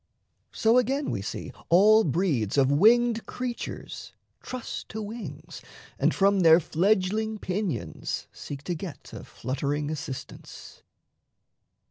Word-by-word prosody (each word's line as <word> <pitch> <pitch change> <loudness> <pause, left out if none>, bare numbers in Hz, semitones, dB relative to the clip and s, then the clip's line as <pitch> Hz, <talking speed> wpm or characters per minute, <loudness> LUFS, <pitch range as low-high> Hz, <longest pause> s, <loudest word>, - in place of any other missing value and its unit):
So 225 +3 +4
again, 270 +4 -1
we - - -2
see - - -6 0.2
All 215 +5 +6
breeds 145 - 0
of 135 0 +4
winged 230 +8 +4
creatures 250 -1 -6 0.3
trust 255 -2 -6
to 220 - -5
wings 220 +2 -7 0.4
And - - +3
from 200 0 +3
their 165 -2 +7
fledgling 205 +6 +1
pinions 180 - -3
seek 140 -1 -8
to 175 - -2
get 170 -1 -8
A - - -8
fluttering 145 +4 -3
assistance. 150 -4 -8
190 Hz, 115 wpm, -27 LUFS, 145-220 Hz, 0.4 s, their